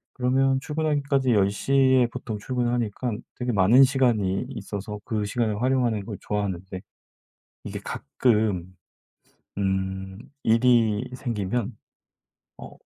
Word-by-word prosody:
그러면 130 +1 +2
출근하기까지 145 -3 0
10 100 -2 +3
시에 130 +4 +3
보통 120 -2 -6
출근하니깐 120 -1 -2
되게 125 0 -2
많은 110 +6 +6
시간이 120 -8 +2
있어서 105 +1 -6
그 110 -2 -2
시간을 110 0 -1
활용하는 125 -5 +1
걸 105 -2 -6
좋아하는데. 95 -3 -3 0.8
이게 - - -6
가끔 105 - 0 0.9
음 95 -1 -2 0.2
일이 115 0 +3
생기면 115 -2 -3 0.8
어 - - -10
115 Hz, 245 characters per minute, -25 LUFS, 100-125 Hz, 0.9 s, 많은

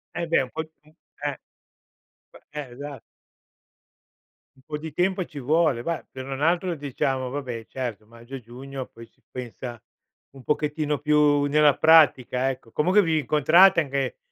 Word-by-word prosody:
Eh, 170 - -2
beh, 160 -5 +3
un 125 - -8
po', 160 - -3 0.2
uhm, 155 +1 -24 0.3
eh - - -1 1.0
B - - -13 0.2
eh, 145 -4 -6
esa 140 0 -8 1.6
Un - - -24
po' 150 -1 -5
di 160 0 -7
tempo 185 +4 0
ci 150 -4 -9
vuole. 145 -2 +1
Bah, 170 +2 -3
se 130 0 -7
non 135 +1 -6
altro, 175 +2 +1
diciamo, 135 -3 -2
va 145 +1 -4
beh, 115 -3 -6
certo, 120 -5 -5
maggio 115 +3 -15
e - - -6
giugno 130 +3 -8
poi 115 0 -13
si - - -34
pensa 120 -1 -7 0.5
un 135 -2 -14
pochettino 150 0 -1
più 150 -1 +3
nella 150 0 +4
pratica, 135 -5 +4
ecco. 125 -3 -7
Comunque, 185 +7 +3
vi 160 -3 +1
incontrate 160 +6 +5
anche, 140 -2 -2
145 Hz, 165 wpm, -25 LUFS, 130-155 Hz, 1.6 s, incontrate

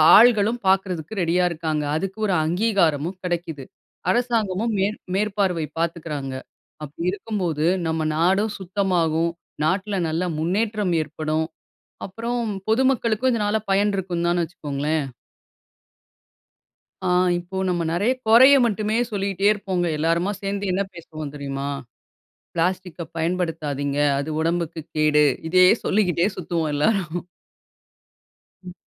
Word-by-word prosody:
ஆள்களும் 225 0 +5
பார்க்குறதுக்கு 190 -2 +1
ரெடியா 175 +1 +2
இருக்காங்க. 155 -2 -2
அதுக்கு 195 +5 -3
ஒரு 195 - +1
அங்கீகாரமும் 175 -3 +1
கெடைக்கிது. 170 -5 -3 0.5
அரசாங்கமும் 225 -1 +1
மே 195 - +3 0.3
மேற்பார்வை 195 -5 0
பார்த்துக்கிறாங்க. 155 -5 -3 0.5
அப்படி 155 +4 -5
இருக்கும்போது 185 -7 -2 0.2
நம்ம 160 0 -1
நாடும் 190 +6 +2
சுத்தமாகும். 175 -4 0 0.3
நாட்டுல 195 +4 0
நல்ல 165 +3 -1
முன்னேற்றம் 200 +3 0
ஏற்படும். 155 +1 -2 0.6
அப்புறம் 235 +5 -3 0.3
பொதுமக்களுக்கும் 250 0 +2
இதனால 210 -1 +1
பயன் 200 +2 +3
இருக்கும்தான்னு 175 -2 0
வச்சுக்கோங்களேன். 150 -2 -2 2.0
ஆ, - - +2 0.3
இப்போ 175 +2 -8
நம்ம 175 -1 0
நெறைய, 200 +9 +2 0.2
கொறைய 255 +5 +8
மட்டுமே 215 0 -1
சொல்லிகிட்டே 195 -2 -2
இருப்போங்க. 190 -4 -2
எல்லருமா 165 +4 +1
சேந்து 200 -1 -2
என்ன 190 +2 +1
பேசுவோம் 155 -3 -8
தெரியுமா? 140 -1 -4 0.9
"பிளாஸ்டிக்க 180 0 -2
பயன்படுத்தாதீங்க, 160 -5 -1 0.2
அது 140 +2 -3
உடம்புக்கு 165 0 -1 0.2
கேடு" 150 -1 +4 0.3
இதையே 185 +1 +6
சொல்லிக்கிட்டே 180 -4 +2
சுத்துவோம் 165 -3 -2
எல்லோரும். 175 +1 0 1.4
ம். 180 -1 -9
180 Hz, 105 wpm, -23 LUFS, 160-200 Hz, 2.0 s, கொறைய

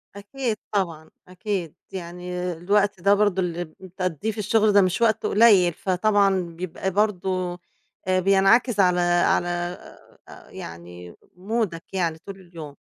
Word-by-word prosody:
أكيد 220 +2 -4
طبعًا، 165 -6 -2 0.2
أكيد. 185 -3 -4 0.2
يعني 180 0 -5
الوقت 200 +2 0
ده 200 +2 +4
برضو 205 -2 +2
اللي 175 0 -2
بتقضّيه 185 +2 -5
في 215 - -13
الشغل 210 0 +2
ده 200 - +6
مش 185 +4 0
وقت 220 -1 +2
قليل، 200 -6 +5
فطبعًا 195 +1 +1
بيبقى 175 +2 -5
برضو 185 -3 -1 0.5
آآ، 185 0 +2
بينعكس 195 +4 +3
على 180 -2 +4
على 175 0 +2 0.8
آآ، - - -14
يعني 85 +1 -10 0.2
مودك 195 -3 -3
يعني 170 -4 -1
طُول 195 +3 -11
اليوم. 165 -5 -11
185 Hz, 130 wpm, -23 LUFS, 175-205 Hz, 0.8 s, ده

